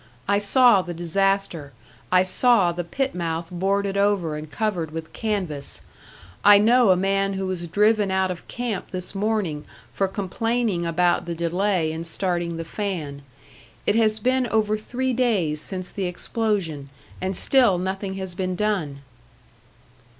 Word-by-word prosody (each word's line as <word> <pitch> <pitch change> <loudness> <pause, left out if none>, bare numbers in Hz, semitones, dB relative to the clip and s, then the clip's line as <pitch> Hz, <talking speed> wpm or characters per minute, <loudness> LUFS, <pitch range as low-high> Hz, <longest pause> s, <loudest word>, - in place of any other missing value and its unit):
I 200 0 +3
saw 220 0 +5
the 175 -1 -7
disaster, 175 -3 -1 0.4
I 180 0 +5
saw 195 -1 +3
the 175 +1 -4
pit 270 +10 -2
mouth 165 -1 -3
boarded 195 +2 0
over 200 -6 +1
and 150 0 -7
covered 175 0 -2
with 160 +1 -7
canvas. 185 -10 -3 0.6
I 205 0 +8
know 235 +2 +4
a 185 - +6
man 195 +1 +1
who 190 0 -3
was 180 -2 -4
driven 210 +3 +2
out 190 0 +1
of 175 - -8
camp 235 -5 -4
this 185 0 -5
morning 195 -7 -1 0.3
for 195 - 0
complaining 205 -1 -1
about 175 +1 +1
the 170 - -3
delay 170 0 0
in 160 +1 -5
starting 175 0 -1
the 165 - -5
fan. 165 -7 -4 0.6
It - - +3
has 220 -1 +3
been 255 +2 +1
over 215 -2 +1
three 255 +4 -2
days 200 -12 +1
since 185 0 -4
the 195 - -3
explosion, 180 - -2 0.3
and 185 0 -2
still 245 -9 +4
nothing 190 +1 -3
has 190 -2 -4
been 185 0 -2
done." 180 -9 -1
190 Hz, 150 wpm, -23 LUFS, 170-210 Hz, 0.6 s, I